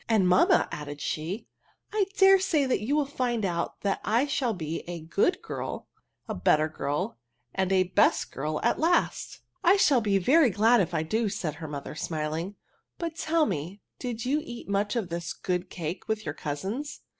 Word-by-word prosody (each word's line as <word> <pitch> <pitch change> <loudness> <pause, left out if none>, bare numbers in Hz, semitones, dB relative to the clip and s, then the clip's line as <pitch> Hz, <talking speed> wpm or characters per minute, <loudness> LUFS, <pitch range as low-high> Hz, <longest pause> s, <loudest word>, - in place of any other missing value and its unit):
And^ 220 -4 +4
mamma/' 180 0 +4
added 145 -1 -6
she^ 160 +8 -3 0.2
" - - -33
I 415 -3 +2
dare 385 0 +7
say 330 -7 +2
you 250 +8 -1
will 300 -1 +2
find 245 -5 -1
out 170 -2 -2
that 200 -1 -1
I 230 +6 +2
shall 255 -6 0
be 160 -2 -3
a 175 -1 -5
good 200 - 0
girl, - - -5 0.4
a - - -3
better 155 0 +3
girl| 145 -5 -3 0.3
and 190 0 0
a 190 -1 +4
best 180 - +2
girl 150 +2 -2
at - - +2
last 335 +2 +1
'* - - -52
" - - -46
I 360 +2 +6
shall 280 - +4
be 205 -2 +2
very 270 - +5
glad 220 +3 +4
if 175 -2 -2
I 160 - +1
do," 215 +7 0
said 165 -5 -3
her 160 - -4
mother, 145 -2 -6
smiling; 160 +4 -3 0.2
" - - -48
but 335 -2 -4
tell 320 0 +2
me 180 - -4 0.2
did 240 -3 -4
you 290 +4 +1
eat 240 -1 -8
much 200 +2 0
of 215 -7 -1
this 170 0 -4
good 180 0 -2
cake 170 +1 -5
with 220 -2 -2
your 150 - -2
cousins? 195 - -4
200 Hz, 200 wpm, -27 LUFS, 165-260 Hz, 0.4 s, dare